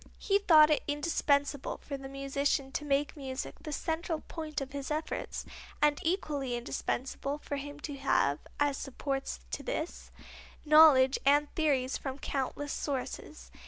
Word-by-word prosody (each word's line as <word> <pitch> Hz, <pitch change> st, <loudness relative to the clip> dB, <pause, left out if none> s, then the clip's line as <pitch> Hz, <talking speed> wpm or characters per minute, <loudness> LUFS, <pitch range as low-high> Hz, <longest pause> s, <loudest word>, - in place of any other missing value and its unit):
He 400 Hz, -1 st, +2 dB
thought 310 Hz, -6 st, +7 dB
it 300 Hz, -, +3 dB
indispensable 290 Hz, -2 st, 0 dB
for 280 Hz, -, -6 dB
the 270 Hz, 0 st, -7 dB
musician 275 Hz, 0 st, -1 dB
to 300 Hz, -, -3 dB
make 285 Hz, +1 st, 0 dB
music 265 Hz, -2 st, -5 dB
the 305 Hz, -, -6 dB
central 320 Hz, +2 st, -2 dB
point 310 Hz, -2 st, -5 dB
of 275 Hz, -1 st, -6 dB
his 280 Hz, -1 st, -5 dB
efforts 310 Hz, +1 st, -3 dB, 0.3 s
and 295 Hz, -1 st, +3 dB
equally 295 Hz, -8 st, -1 dB
indispensable 265 Hz, +3 st, -3 dB
for 290 Hz, -1 st, -5 dB
him 290 Hz, +1 st, -7 dB
to 290 Hz, -2 st, -5 dB
have, 150 Hz, -, +2 dB, 0.2 s
as 290 Hz, -1 st, +2 dB
supports 275 Hz, 0 st, -3 dB
to -, -, -3 dB
this, 350 Hz, -9 st, -4 dB, 0.6 s
knowledge 295 Hz, -4 st, +7 dB
and 290 Hz, +1 st, +3 dB
theories 275 Hz, -5 st, +1 dB
from 270 Hz, -1 st, -5 dB
countless 280 Hz, +1 st, -3 dB
sources. 285 Hz, +2 st, -4 dB
285 Hz, 145 wpm, -31 LUFS, 275-305 Hz, 0.6 s, thought